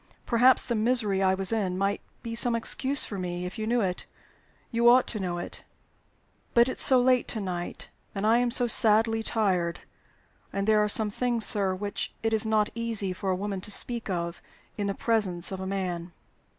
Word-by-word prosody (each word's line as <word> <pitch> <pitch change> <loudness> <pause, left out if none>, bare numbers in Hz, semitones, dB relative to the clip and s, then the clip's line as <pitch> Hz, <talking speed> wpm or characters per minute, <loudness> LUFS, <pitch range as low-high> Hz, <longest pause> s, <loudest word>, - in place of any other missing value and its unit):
Perhaps 250 +2 +4
the 240 - -1
misery 215 -3 +1
I 190 0 +3
was 190 +1 -1
in 195 -5 -1
might 195 +1 -1 0.2
be 230 -1 -5
some 235 0 +4
excuse 265 +4 +2
for 200 - -6
me, 180 0 -4
if 185 +5 -7
you 215 - -3
knew 240 +1 +1
it. 180 -3 -3 0.6
You 235 0 +4
ought 250 +1 +5
to 215 - -2
know 180 -2 -3
it. 175 - -4 0.9
But 235 +1 +6
it's 260 - -2
so 260 -2 +4
late 250 0 +2
to 225 - -1
night, 180 -3 -5 0.2
and 200 +1 -2
I 225 +2 +4
am 245 0 +1
so 245 +1 0
sadly 225 0 +3
tired 185 -7 -1 0.7
and 195 0 -2
there 215 0 +3
are 210 - 0
some 210 0 +1
things, 240 0 0
sir, 195 -3 +2
which 200 +2 -5
it 225 0 0
is 220 0 +3
not 215 -1 +1
easy 225 -4 -2
for 190 +1 -4
a 185 - +1
woman 195 0 -4
to 210 - -2
speak 235 +2 -1
of 170 -2 -3 0.3
in 205 -1 -3
the 200 - -2
presence 200 -7 0
of 190 - -5
a 190 - -5
man." 180 -3 -4
210 Hz, 205 wpm, -27 LUFS, 190-230 Hz, 0.9 s, But